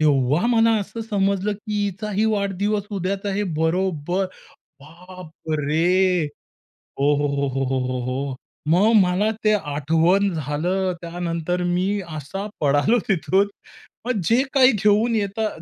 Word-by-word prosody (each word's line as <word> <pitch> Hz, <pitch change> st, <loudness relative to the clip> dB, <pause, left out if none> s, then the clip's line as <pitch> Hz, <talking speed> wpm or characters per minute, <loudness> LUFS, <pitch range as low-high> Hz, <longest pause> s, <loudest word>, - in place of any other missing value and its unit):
तेव्हा 145 Hz, -, +2 dB
मला 230 Hz, -1 st, +4 dB
असं 210 Hz, +3 st, -6 dB
समजलं, 200 Hz, 0 st, +1 dB
की 210 Hz, 0 st, -3 dB
हिचाही 205 Hz, +2 st, -2 dB
वाढदिवस 200 Hz, +1 st, -1 dB
उद्याच 195 Hz, 0 st, -3 dB
आहे. 200 Hz, +1 st, -1 dB, 0.2 s
बरोबर. 175 Hz, +1 st, 0 dB, 0.6 s
बापरे! 170 Hz, +1 st, -1 dB, 0.8 s
हो, 145 Hz, +1 st, +4 dB
हो, 145 Hz, -, 0 dB
हो, 140 Hz, 0 st, -1 dB
हो, 135 Hz, 0 st, 0 dB
हो, 130 Hz, 0 st, 0 dB
हो, 130 Hz, 0 st, -2 dB
हो. 135 Hz, +1 st, -3 dB, 0.4 s
मग 205 Hz, +6 st, +4 dB
मला 185 Hz, +4 st, +1 dB
ते 215 Hz, -, +4 dB
आठवण 165 Hz, +4 st, +1 dB
झालं. 170 Hz, +6 st, -1 dB
त्यानंतर 170 Hz, 0 st, -3 dB
मी 185 Hz, +3 st, 0 dB, 0.2 s
असा 195 Hz, +8 st, -5 dB
पळालो 145 Hz, +11 st, +3 dB
तिथून, 195 Hz, +2 st, +2 dB, 0.6 s
मग 245 Hz, -5 st, 0 dB
जे 235 Hz, +7 st, +3 dB
काही 260 Hz, -1 st, +6 dB
घेऊन 210 Hz, +3 st, +2 dB
येता 210 Hz, +1 st, -1 dB
185 Hz, 125 wpm, -22 LUFS, 155-205 Hz, 0.8 s, काही